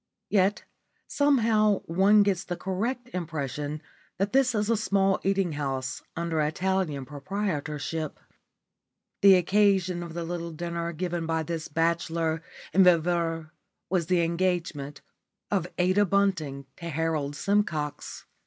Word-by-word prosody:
Yet 200 0 +2 0.4
somehow 225 -8 +3
one 195 +5 +4
gets 190 -2 0
the 175 -2 -4
correct 235 +7 -3
impression 150 -3 -4 0.3
that 200 +2 -1
this 260 -3 +3
is 210 -1 +1
a 230 - +3
small 195 -3 +2
eating 195 -2 +1
house 135 -4 -3
under 165 -1 -1
Italian 155 -2 -1
proprietorship. 150 -1 -3 1.0
The 195 -1 +8
occasion 185 -1 +2
of 170 -1 -7
the 170 - -3
little 170 0 -4
dinner 170 +1 -3
given 170 0 -3
by 160 -1 0
this 160 0 -4
bachelor 165 0 0 0.3
and 190 +3 +6
viveur 165 -2 +2 0.4
was 175 -4 +1
the 180 -1 +3
engagement 170 -4 -1 0.5
of 190 -4 +1
Ada 185 +3 +3
Bunting 170 -9 0
to 170 - -6
Harold 155 -2 -1
Simcox. 155 -6 -1
170 Hz, 125 wpm, -27 LUFS, 160-195 Hz, 1.0 s, The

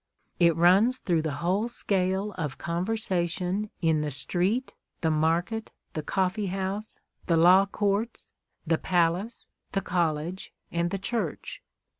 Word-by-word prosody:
It 170 -2 +5
runs 190 +9 +5
through 170 -8 0
the 155 -2 -2
whole 195 +6 +1
scale 195 -3 -1
of 150 -8 -4
conversation 180 +1 -1
in 160 -2 +3
the 150 - -1
street, 185 - -1 0.3
the 160 -2 +2
market, 170 +8 0 0.2
the 155 - -2
coffee 190 +5 0
house, 195 +3 -4 0.3
the 170 - +3
law 185 +4 +6
courts, 205 +3 -2 0.3
the 165 -1 +1
palace, 180 +5 0 0.3
the 195 - +1
college, 170 0 -2 0.2
and 170 0 0
the 195 - -2
church. 195 -4 -4
185 Hz, 130 wpm, -27 LUFS, 165-200 Hz, 0.3 s, law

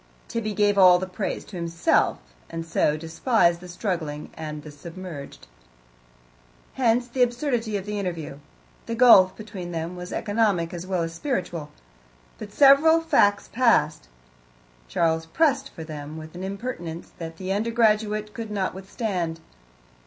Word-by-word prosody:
Tibby 215 -3 -3
gave 205 -1 +3
all 180 -1 +8
the 185 - -3
praise 190 +2 -4
to 200 - -11
himself, 170 -1 +1 0.3
and 165 0 -5
so 155 -2 +1
despised 170 - +1
the 180 - -11
struggling 170 -5 -4
and 150 -1 -7
the 150 - -9
submerged. 165 -1 -9 1.3
Hence 245 -1 +2
the 250 +1 -3
absurdity 240 -3 0
of 195 - -6
the 210 0 -3
interview; 170 -7 -5 0.5
the 230 - -2
gulf 210 -6 +7
between 200 -5 -7
them 165 +2 -4
was 180 0 -8
economic 205 -6 0
as 175 +1 -6
well 185 -3 0
as 165 0 -4
spiritual. 175 - -3 0.7
But - - -8
several 290 +4 +6
facts 205 -11 +2
passed: 155 - +2 0.8
Charles 160 - 0
pressed 275 - +1
for 160 - -9
them 155 -1 -7
with 160 0 -9
an 180 +1 -7
impertinence 190 -5 -6
that 165 -1 -7
the 185 +1 -4
undergraduate 215 -1 +1
could 225 -2 -6
not 200 -3 -2
withstand. 190 -4 -3
185 Hz, 145 wpm, -25 LUFS, 165-225 Hz, 1.3 s, all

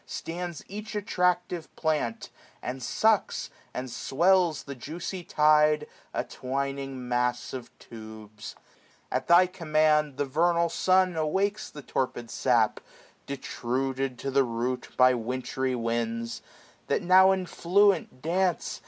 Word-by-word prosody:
Stands 170 -1 -5
each 210 +2 -7
attractive 180 -4 0
plant, 150 -8 -1 0.3
and 130 +1 -4
sucks, 215 - +1 0.2
and 130 +1 -5
swells 165 +8 +2
The 140 - -7
juicy 170 +8 -6
tide; 150 -1 +4 0.3
a - - -1
twining 135 -1 -4
mass 125 0 -1
of 130 -2 -6
tubes* 110 -1 -10 0.6
At - - -1
Thy 175 +2 +7
command 155 -5 +1
the 145 - 0
vernal 170 +4 +2
sun 185 +1 +2
awakes 195 +7 0
The 150 - -10
torpid 120 -3 -3
sap, 120 -4 +2 0.5
detruded 130 -1 -3
to 135 - -4
the 135 0 +4
root 125 +1 -2
$6^ - - -27
By 130 0 +6
wintry 130 +2 -2
winds; 115 0 -2 0.5
that - - 0
now 185 +2 +7
in 190 -1 0
fluent 185 -7 +2
dance. 180 +2 0
145 Hz, 125 wpm, -27 LUFS, 125-175 Hz, 0.6 s, Thy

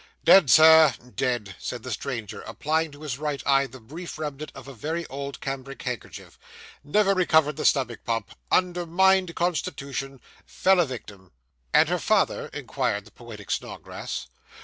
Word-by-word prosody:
'Dead, 190 -8 +7
sir 160 -2 +8 0.2
dead,' 115 -7 -1
said 120 -2 -5
the 130 - -6
stranger, 115 -3 -5
applying 160 +2 -1
to 145 +1 -14
his 140 -4 -4
right 150 -2 -3
eye 135 0 +3
the 130 +1 -13
brief 155 +10 -9
remnant 150 -1 -5
of 135 -1 -11
a 135 - -9
very 160 +8 -4
old 140 -1 -6
cambric 135 0 -6
handkerchief. 125 -3 -7 0.4
'Never 195 +7 +3
recovered 160 -5 +3
the - - -4
stomach 130 -5 +1
pump 115 -3 -2 0.2
undermined 180 0 +2
constitution 140 -6 -3 0.2
fell 190 -1 +2
a 170 - +3
victim.' 100 -7 -9 0.4
'And - - +5
her - - 0
father?' - - +1
inquired - - -2
the - - -16
poetic - - -10
Snodgrass. 60 - -5
140 Hz, 150 wpm, -25 LUFS, 125-165 Hz, 0.4 s, sir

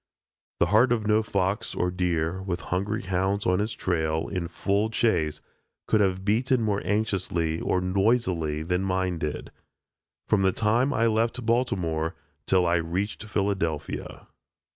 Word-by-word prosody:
The - - +5
heart 120 +4 +5
of 115 -3 +1
no 105 +1 +3
fox 100 -1 -1
or 90 0 0
deer, 90 0 -1
with 90 -2 -3
hungry 100 +4 -1
hounds 95 +2 0
on 90 +1 +2
his 105 +2 -1
trail, 80 -3 -1
in 90 -3 -3
full 100 +5 0
chase, 90 -10 0 0.4
could 110 - +3
have 95 -1 0
beaten 120 +5 +2
more 105 -2 0
anxiously 95 -6 -1
or 90 - +1
noisily 90 -5 +1
than 90 +3 0
did 95 - -2
mine, 95 -3 -1 1.1
from 105 - +3
the 95 0 +3
time 115 +7 +2
I 115 -3 +2
left 115 +2 0
Baltimore 90 -9 0 0.3
till 90 -1 +3
I 85 0 +3
reached 90 +6 -3
Philadelphia. 95 -7 -2
95 Hz, 145 wpm, -26 LUFS, 85-110 Hz, 1.1 s, The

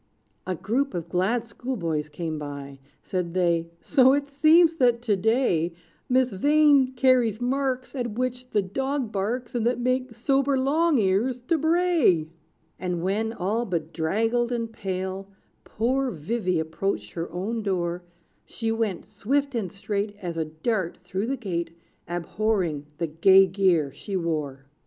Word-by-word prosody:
A 185 - -1
group 255 - -1
of 170 -1 -4
glad 205 +7 +1
schoolboys 170 - -3
came 155 0 -4
by: 140 -2 -7 0.2
Said 180 -2 -3
they, 170 -2 +1
"So 265 -2 +5
it 285 0 0
seems, 320 +4 +5
that 245 -4 +3
to 215 -4 +2
day, 190 -5 +1 0.4
Miss 255 0 +3
Vain 285 +3 +4
carries 245 -4 +3
marks 260 +1 -1
At 240 -5 -3
which 250 0 -2
the 205 - +1
dog 265 +4 -2
barks, 230 +5 -2
And 240 -2 0
that 245 +1 0
make 255 -1 -1
sober 270 +3 +1
Long 300 +4 +2
Ears 225 +5 +1
to 325 +6 +1
bray." 320 - +3 0.5
And 180 -2 -2
when, 210 +4 0
all 220 +2 -1
bedraggled 195 +7 -1
and 230 -2 -3
pale, 190 -2 -4 0.4
Poor 260 +4 0
Vivy 185 +1 -1
approached 160 - -2
her 165 +9 -5
own 210 +6 -3
door, 180 -3 -1 0.4
She 225 -1 -3
went, 225 -5 -2
swift 270 +8 -1
and 210 -7 -2
straight 205 +1 -3
As 175 -4 -5
a 160 -1 -1
dart, 170 +4 -2
through 185 +4 -4
the 270 +1 -1
gate, 170 -7 -4 0.3
Abhorring 175 -3 -1
the 170 - -1
gay 190 +5 +6
gear 180 -6 +2
she 200 - -6
wore. 150 -6 -3
210 Hz, 145 wpm, -25 LUFS, 175-255 Hz, 0.5 s, gay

